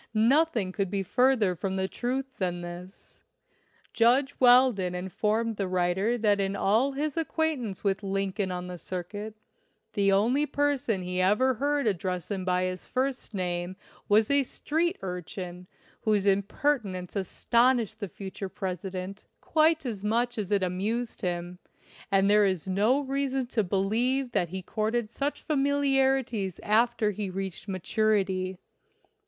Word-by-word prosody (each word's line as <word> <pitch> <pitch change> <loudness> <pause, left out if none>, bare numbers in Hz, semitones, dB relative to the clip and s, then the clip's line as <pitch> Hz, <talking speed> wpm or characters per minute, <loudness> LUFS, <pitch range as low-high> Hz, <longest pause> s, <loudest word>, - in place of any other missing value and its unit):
Nothing 235 - +3
could 195 0 -2
be 195 0 -1
fur 255 +7 +3
ther 200 -7 +1
from 190 +2 -3
the 190 0 0
truth 255 +6 -2
than 175 -2 -1
this. 175 +2 -10 0.7
Judge 260 +5 +3
Weldon 245 -8 +5
informed 210 +5 -1
the 195 - -1
writer 185 +5 +1
that 210 -3 +2
in 195 0 0
all 225 +8 +2
his 295 +2 -2
acquaintance 310 - -1
with 195 -1 0
Lincoln 195 0 -1
on 180 0 -4
the 180 -1 -7
circuit, 205 +5 -6 0.6
the 200 -1 +2
only 240 +10 +2
person 275 -10 0
he 180 0 -1
ever 215 +8 +3
heard 285 +3 0
address 185 -2 -2
him 195 -2 -2
by 180 0 +1
his 185 0 -4
first 260 -3 -2
name 175 -1 -2 0.3
was 215 +4 +4
a 280 0 +5
street 325 +6 -1
urchin 180 0 -6 0.3
whose 210 -2 +1
impertinence 200 -1 0
astonished 230 +4 +1
the 200 -4 -4
future 195 +1 -7
President 185 +1 -5
quite 315 -1 +2
as 215 -5 -4
much 235 +2 0
as 200 -3 -3
it 200 -2 +2
amused 210 +6 -2
him, 175 -1 -3 0.5
and 195 0 +4
there 205 0 +5
is 185 -2 -2
no 210 +9 +2
reason 270 -1 -1
to 240 -3 0
believe 235 +8 0
that 175 -6 0
he 190 +1 -5
courted 220 +3 -1
such 285 +4 -3
familiarities 270 - +1
after 220 0 +2
he 205 -1 -4
reached 190 0 -5
maturity. 190 -1 0
205 Hz, 145 wpm, -28 LUFS, 185-250 Hz, 0.7 s, Weldon